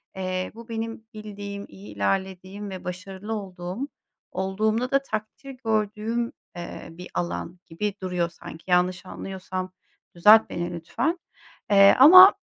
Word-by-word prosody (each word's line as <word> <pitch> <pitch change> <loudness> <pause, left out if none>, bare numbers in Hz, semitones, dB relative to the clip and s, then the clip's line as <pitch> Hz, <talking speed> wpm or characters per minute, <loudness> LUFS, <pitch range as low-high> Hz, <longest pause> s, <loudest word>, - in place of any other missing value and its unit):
eee, 185 -1 -3
bu 230 +1 -12
benim 225 0 -4
bildiğim, 205 -1 -7
iyi 100 +2 -12
ilerlediğim 190 - -2
ve 190 -1 -7
başarılı 190 +4 -6
olduğum, 190 +3 -5 0.4
olduğumda 215 +6 0
da 275 0 +4
takdir 220 +3 -6
gördüğüm, 220 +2 0 0.2
eee, 175 0 -7
bir 180 +2 -10
alan 175 0 -3
gibi 200 +5 -3
duruyor 180 -2 -1
sanki. 165 -1 -11
Yanlış 180 +1 +2
anlıyorsam 185 0 -6 0.4
düzelt 210 +6 +7
beni 175 0 -3
lütfen, 235 - -2 0.5
eee, 195 0 +8
ama 370 +8 +11
195 Hz, 125 wpm, -25 LUFS, 180-220 Hz, 0.5 s, ama